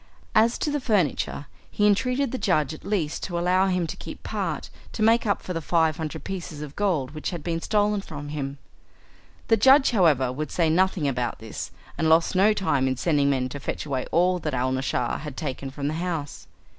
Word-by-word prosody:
As 230 +2 +4
to 300 - -1
the 295 - 0
furniture, 200 - 0 0.2
he 205 - +1
entreated 250 +6 +2
the 260 - -3
judge 155 -7 +1
at 155 - -11
least 185 -7 -1
to 175 -2 -3
allow 180 +2 +3
him 180 -2 +1
to - - -5
keep - - -9
part - - -3 0.2
to 215 - -1
make 230 +1 +4
up 200 - 0
for 180 - -4
the 165 - -3
five 160 -1 +2
hundred 160 -2 -5
pieces 170 -5 -5
of 150 -1 -9
gold 170 -11 0
which 155 0 -4
had 170 -5 -6
been 165 0 -2
stolen 210 0 +1
from 145 -5 -8
him. 140 -2 -4 0.9
The 225 - +4
judge, 265 +5 +6
however, 155 - +3
would 155 +3 -4
say 165 -3 +1
nothing 185 -2 +2
about 125 -3 -1
this, 110 -1 -6 0.3
and 160 - +2
lost 165 +3 +4
no 200 +3 +5
time 165 -11 +1
in 130 -1 -1
sending 145 -2 +2
men 130 -2 +1
to 145 - -6
fetch 140 - -4
away 135 -3 -2
all 180 +2 +3
that 150 -4 -3
Alnaschar 130 -1 -1
had 150 -3 -8
taken 135 -2 -4
from 140 +1 -4
the 150 - -1
house. 165 -3 -4
165 Hz, 205 wpm, -25 LUFS, 145-195 Hz, 0.9 s, judge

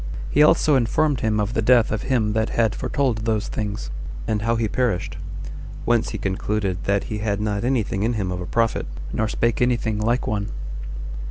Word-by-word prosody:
He 145 - +4
also 150 -1 +5
informed 130 +3 +2
him 110 -1 +1
of 105 +2 0
the 115 - +1
death 120 0 +5
of 105 -1 -1
him 115 -5 +1
that 110 0 +1
had 110 -2 +2
foretold 135 -6 0
those 110 -1 0
things, 105 - -3 0.4
and 105 -1 0
how 115 +2 +1
he 115 -1 +1
perished; 115 -5 -1 0.7
[whence 120 -2 +2
he 110 - -4
concluded 95 -1 -1
that] 100 0 +2
he 105 - -4
had 105 -1 -1
not 105 -1 -1
any 125 -2 +2
thing 95 0 -3
in 115 +3 +1
him 100 -5 -1
of 90 0 -3
a 90 - -5
prophet, 115 -1 +1 0.3
nor 110 - +1
spake 115 +2 0
any 125 -1 +4
thing 110 -2 -2
like 120 +4 +1
one. 105 -1 -1
110 Hz, 200 wpm, -23 LUFS, 105-120 Hz, 0.7 s, also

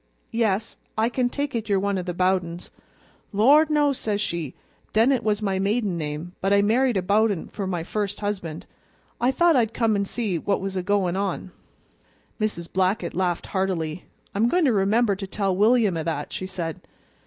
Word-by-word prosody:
'Yes, 225 -2 0 0.2
I 220 +2 +2
can 245 0 0
take 285 +2 -3
it 225 -2 -3
you're 200 -1 +3
one 200 0 0
o' - - -1
the 180 0 -4
Bowdens.' 180 -1 0 0.6
'Lor', 275 +10 +5
no,' 295 -2 +3
says 210 -5 -2
she. 170 -8 -3 0.4
'Dennett 240 +4 +3
was 215 0 0
my 195 -2 0
maiden 205 -1 0
name, 155 +1 -4
but 195 - +1
I 200 0 +5
married 240 +2 +2
a 185 - 0
Bowden 205 -1 +1
for 200 -3 -4
my 175 -3 -2
first 205 +2 -3
husband. 190 -7 -4 0.5
I 245 - +3
thought 335 +4 +4
I'd 230 -3 +1
come 225 -3 +2
an' 200 - +1
just - - -9
see 210 -8 -1
what 200 +5 0
was 195 0 -4
a 185 - 0
goin' 190 -2 +1
on!" 195 -1 -2 0.9
Mrs. 205 -6 -2
Blackett 185 -1 +1
laughed 175 -2 -1
heartily. 180 -4 -2 0.3
"I'm 220 +4 +2
goin' 355 +2 +2
to 255 - +3
remember 205 +2 +2
to 195 0 -6
tell 195 -1 -1
William 215 -1 +4
o' 165 - -1
that," 155 -2 -3
she 185 - -4
said. 170 -4 -5
200 Hz, 190 wpm, -24 LUFS, 185-225 Hz, 0.9 s, Lor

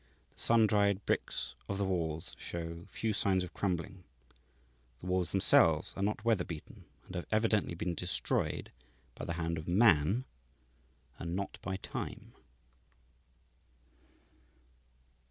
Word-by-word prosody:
The - - -10
sun 115 -1 +5
dried 100 -2 +2
bricks - - -1 0.2
of 100 - -1
the 100 - 0
walls 80 -4 -1
show 85 0 -5
few 110 -1 -1
signs 95 -2 +2
of 90 - -8
crumbling. 95 0 -2 1.0
The - - -11
walls 90 -1 +1
themselves 80 -4 +4
are - - -4
not 105 +2 -1
weather 110 -6 +3
beaten, 80 -4 -9 0.2
and - - -11
have 90 -2 -4
evidently 110 -4 +2
been 85 +1 -2
destroyed 90 +1 0 0.4
by - - -7
the 85 - -2
hand 85 -1 -2
of 80 - -9
man, 100 - +4 0.9
and 85 +1 -3
not 100 +1 -4
by 95 - -3
time. - - -6
95 Hz, 130 wpm, -33 LUFS, 85-100 Hz, 1.0 s, sun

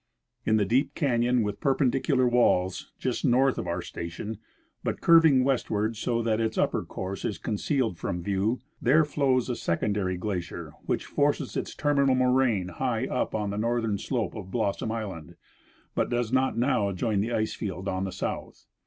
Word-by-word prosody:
In 110 - +4
the 105 - +2
deep 125 +8 +1
canon 125 -4 +2
with 105 -1 -3
perj)endicular 135 -1 +2
walls, 95 -7 +2
just - - -2
north' 130 +2 +3
of - - -4
our 85 0 -2
station, 85 +6 -6 0.4
but - - -2
curving 160 -6 +6
westward 115 -4 0
so 115 +1 -1
that 110 -1 +1
its 110 0 -1
upper - - +1
course 95 +1 -5
is 100 - -2
concealed 110 - -1
from 85 0 -3
view, 100 +5 0 0.2
there 150 +5 +5
flows 135 -4 +1
a 125 - -1
secondary 95 0 -1
glacier 90 -5 -4
which - - -1
forces - - 0
its - - -3
terminal 140 -3 +2
moraine 125 -7 +2
high 85 - -1
up - - -2
on 105 -2 -1
the 100 - -3
northern 115 -2 0
slope 120 -2 -2
of 100 -4 -8
Blossom 110 0 -1
island, 100 -9 -5 0.6
but - - 0
does 120 -1 -1
not 130 -1 +2
now 120 -5 +2
join 100 +2 0
the 115 +3 -2
ice 110 -2 0
field 95 -2 -5
on 95 -1 -1
the 95 - -3
south. - - -5
110 Hz, 170 wpm, -27 LUFS, 100-130 Hz, 0.6 s, curving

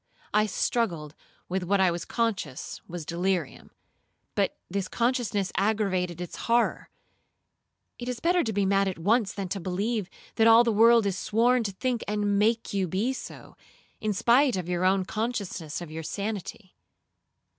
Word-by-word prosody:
I 215 +1 +3
struggled 175 -9 -1 0.3
with 190 +1 -1
what 195 +3 +1
I 185 -2 +4
was 170 0 -4
conscious 205 - -3
was 170 -2 -6
delirium,—but 175 -1 -4
this 190 0 -2
consciousness 235 -6 0
aggravated 190 -4 0
its 180 -1 -6
horror. 235 +1 +1 1.1
It 245 0 -5
is 245 -1 -3
better 350 +3 +2
to 225 - -2
be 200 -1 +1
mad 195 0 +2
at 190 - -3
once, 205 +4 +2
than 195 -2 -4
to 200 - -3
believe 195 +3 -2 0.3
that 225 0 +5
all 230 +1 +8
the 235 - +1
world 230 +1 +5
is 195 -2 -1
sworn 240 +3 +2
to 200 - -1
think 240 +4 -2
and 205 -1 +1
make 225 +1 +1
you 195 -2 0
be 205 +10 0
so, - - -9 0.4
in 215 - -1
spite 245 +6 +4
of 180 -2 -4
your 180 0 0
own 190 0 +3
consciousness 200 -8 -3
of 170 -3 -8
your 160 +1 -5
sanity. 200 +2 -5
200 Hz, 160 wpm, -27 LUFS, 185-230 Hz, 1.1 s, all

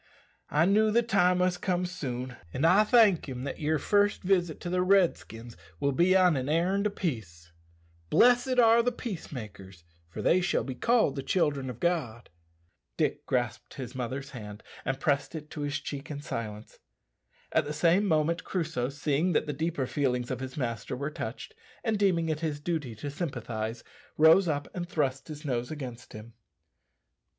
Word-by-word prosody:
I 150 +3 +3
knew 215 +3 +4
the 235 +3 +3
time 180 -5 +3
must 180 0 +1
come 180 -1 0
soon, 130 -8 -5 0.2
an' 140 - 0
I 190 +5 +6
thank 210 - +4
him 125 -1 -5
that 140 - -5
your 155 +1 +1
first 205 +6 +2
visit 180 -4 +1
to 175 - -4
the 180 0 +1
Redskins 170 - +1 0.2
will 140 - +1
be 175 +7 +3
on 180 -3 +4
an 130 +1 -2
errand 185 +6 +2
o' - - -1
peace. 105 - -5 0.6
'Blessed 245 +1 +4
are 230 -1 +6
the 245 +1 +1
peace 230 -7 -6
makers: 95 - -9 0.3
for - - -6
they 185 - +4
shall 180 - +1
be 130 - -5
called 220 - +2
the 135 - -3
children 140 -3 0
of 120 -2 -7
God.'" 130 - -2 0.7
Dick - - -1
grasped 120 -2 -2
his 130 -3 -7
mother's 130 +2 -4
hand 105 -5 -9 0.2
and 135 0 -1
pressed 140 +1 0
it 150 -1 -8
to 150 - -6
his 145 0 -2
cheek 140 -1 -7
in 145 -2 -5
silence. 110 -6 -6 0.7
At - - +2
the 145 - -4
same 175 +6 +3
moment 165 0 +1
Crusoe, 160 -8 -2
seeing 145 +5 0
that - - +2
the 150 - -3
deeper 160 -1 -1
feelings 125 -3 -1
of - - -3
his 130 +1 -7
master 115 -3 -3
were 140 +3 -3
touched, 445 - -6 0.3
and 220 -3 0
deeming 180 -5 +2
it 155 -1 -1
his 155 -3 -2
duty 150 -7 -3
to 140 +7 -6
sympathize, 120 -8 -4 0.3
rose 160 +4 +6
up 145 -2 -1
and 175 -1 -5
thrust 135 -5 -1
his 155 0 -8
nose 125 -3 -2
against 125 -6 -7
him. 110 +2 -10
150 Hz, 180 wpm, -29 LUFS, 130-180 Hz, 0.7 s, I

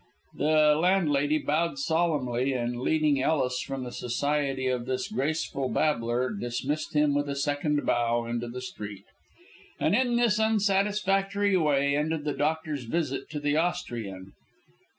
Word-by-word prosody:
The 155 0 +4
landlady 155 -5 +2
bowed 155 +1 0
solemnly, 140 -5 0
and, 120 -1 -2
leading 150 -2 +2
Ellis 130 -3 +1
from 135 -1 -5
the 125 - -6
society 135 +2 -1
of 125 -1 -1
this 130 -1 -2
graceful 135 +1 -2
babbler, 125 -3 0
dismissed 130 +9 -3
him 150 -1 +3
with 145 0 0
a 140 - -2
second 145 +1 0
bow 120 0 +1
into 120 0 -3
the 125 +2 -6
street. 105 -5 -8 0.7
And - - +2
in 245 -2 +2
this 235 -3 +3
unsatisfactory 200 -2 +1
way 140 -4 +2
ended 150 +1 -1
the 150 -1 -1
doctor's 150 -2 -2
visit 145 +1 -2
to 150 - -4
the 145 +1 0
Austrian. 115 - -3
145 Hz, 140 wpm, -27 LUFS, 125-160 Hz, 0.7 s, The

